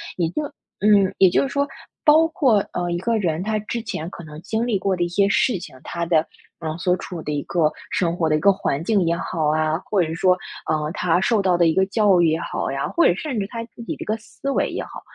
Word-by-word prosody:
也 170 Hz, -3 st, 0 dB
就 300 Hz, -, -3 dB, 0.4 s
嗯， 200 Hz, -2 st, +4 dB
也 190 Hz, -, +6 dB
就 -, -, +2 dB
是 275 Hz, -, -2 dB
说， 280 Hz, +1 st, 0 dB, 0.4 s
包 310 Hz, +2 st, +6 dB
括， 265 Hz, -9 st, +3 dB, 0.2 s
呃， 175 Hz, 0 st, -2 dB
一 175 Hz, -, -1 dB
个 230 Hz, +5 st, 0 dB
人 175 Hz, -4 st, -1 dB
他 215 Hz, +1 st, -1 dB
之 220 Hz, +3 st, -4 dB
前 175 Hz, -7 st, -5 dB
可 175 Hz, -, -10 dB
能 155 Hz, 0 st, -10 dB
经 225 Hz, +5 st, -2 dB
历 225 Hz, -5 st, 0 dB
过 195 Hz, 0 st, 0 dB
的 175 Hz, -, 0 dB
一 175 Hz, -, -1 dB
些 195 Hz, +3 st, +2 dB
事 205 Hz, +2 st, +2 dB
情， 165 Hz, -, -10 dB
他 170 Hz, 0 st, -3 dB
的， 165 Hz, -2 st, +2 dB, 0.3 s
呃， 160 Hz, -1 st, -4 dB
所 180 Hz, +1 st, +1 dB
处 175 Hz, -3 st, -7 dB
的 150 Hz, -, -4 dB
一 145 Hz, -, -1 dB
个 160 Hz, -3 st, +1 dB, 0.2 s
生 170 Hz, -2 st, 0 dB
活 165 Hz, -2 st, 0 dB
的 155 Hz, -, +3 dB
一 -, -, +1 dB
个 200 Hz, +5 st, +5 dB
环 145 Hz, -6 st, -2 dB
境 205 Hz, +2 st, +2 dB
也 170 Hz, -, +2 dB
好 165 Hz, -3 st, -2 dB
啊， 155 Hz, +1 st, +1 dB
或 200 Hz, -3 st, +1 dB
者 170 Hz, -, 0 dB
是 160 Hz, -, -4 dB
说， 180 Hz, +1 st, +3 dB, 0.3 s
呃， 155 Hz, -1 st, 0 dB
他 175 Hz, -1 st, +1 dB
受 220 Hz, +1 st, +2 dB
到 185 Hz, -2 st, +2 dB
的 170 Hz, -1 st, +4 dB
一 160 Hz, -, +3 dB
个 190 Hz, +2 st, +3 dB
教 200 Hz, -3 st, +3 dB
育 170 Hz, -, +4 dB
也 160 Hz, +1 st, +1 dB
好 -, -, -3 dB
呀， 135 Hz, 0 st, -2 dB
或 340 Hz, -, +2 dB
者 -, -, +4 dB
甚 260 Hz, +1 st, -3 dB
至 195 Hz, -, -2 dB
他 230 Hz, +2 st, -5 dB
自 235 Hz, -, -14 dB
己 -, -, -4 dB
的 -, -, -7 dB
一 -, -, -13 dB
个 215 Hz, -, 0 dB
思 230 Hz, +5 st, -7 dB
维 -, -, +1 dB
也 -, -, -3 dB
好， -, -, -10 dB
180 Hz, 295 characters per minute, -22 LUFS, 165-215 Hz, 0.4 s, 也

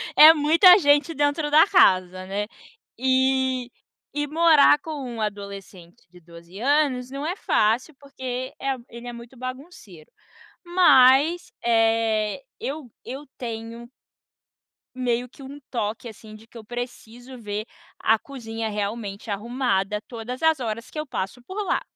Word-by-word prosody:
é 315 Hz, +1 st, +10 dB
muita 330 Hz, +5 st, +6 dB
gente 290 Hz, +1 st, +3 dB
dentro 295 Hz, +1 st, 0 dB
da 315 Hz, +5 st, +6 dB
casa, 185 Hz, -, +3 dB
né? 205 Hz, +2 st, -3 dB, 0.5 s
E 260 Hz, -1 st, +1 dB, 0.4 s
e 295 Hz, 0 st, -1 dB
morar 310 Hz, -1 st, +5 dB
com 320 Hz, -, -11 dB, 0.3 s
um 225 Hz, -, -5 dB
adolescente 200 Hz, -3 st, -7 dB
de 180 Hz, +1 st, -17 dB
12 170 Hz, +2 st, -14 dB
anos 265 Hz, -1 st, +1 dB
não 275 Hz, +2 st, -5 dB
é 355 Hz, -, -2 dB
fácil, 240 Hz, -, +1 dB
porque, 260 Hz, -2 st, -6 dB
eh, 270 Hz, -1 st, -2 dB
ele 235 Hz, +1 st, -10 dB
é 240 Hz, -, -6 dB
muito 235 Hz, +2 st, -12 dB
bagunceiro, 255 Hz, -, -10 dB, 0.6 s
mas, 330 Hz, -2 st, +5 dB
eh, 225 Hz, 0 st, +1 dB, 0.2 s
eu 280 Hz, -2 st, -6 dB
eu 275 Hz, +3 st, -8 dB
tenho 230 Hz, 0 st, -7 dB, 1.1 s
meio 245 Hz, -1 st, -1 dB
que 270 Hz, -, -15 dB
um 280 Hz, +2 st, -10 dB
toque, 225 Hz, -1 st, -3 dB
assim, 215 Hz, 0 st, -13 dB
de 220 Hz, +1 st, -16 dB
que 235 Hz, -, -14 dB
eu 225 Hz, -, -10 dB
preciso 245 Hz, +1 st, -8 dB
ver 210 Hz, -1 st, -5 dB, 0.3 s
a 225 Hz, -, +3 dB
cozinha 225 Hz, -3 st, -6 dB
realmente 205 Hz, 0 st, -5 dB
arrumada 210 Hz, -2 st, -1 dB
todas 245 Hz, +1 st, -7 dB
as 320 Hz, -2 st, +3 dB
horas 230 Hz, -1 st, -5 dB
que 310 Hz, -, -7 dB
eu 305 Hz, -, -3 dB
passo 240 Hz, -2 st, -5 dB
por 395 Hz, +9 st, -5 dB
lá. -, -, 0 dB
245 Hz, 140 wpm, -24 LUFS, 215-280 Hz, 1.1 s, é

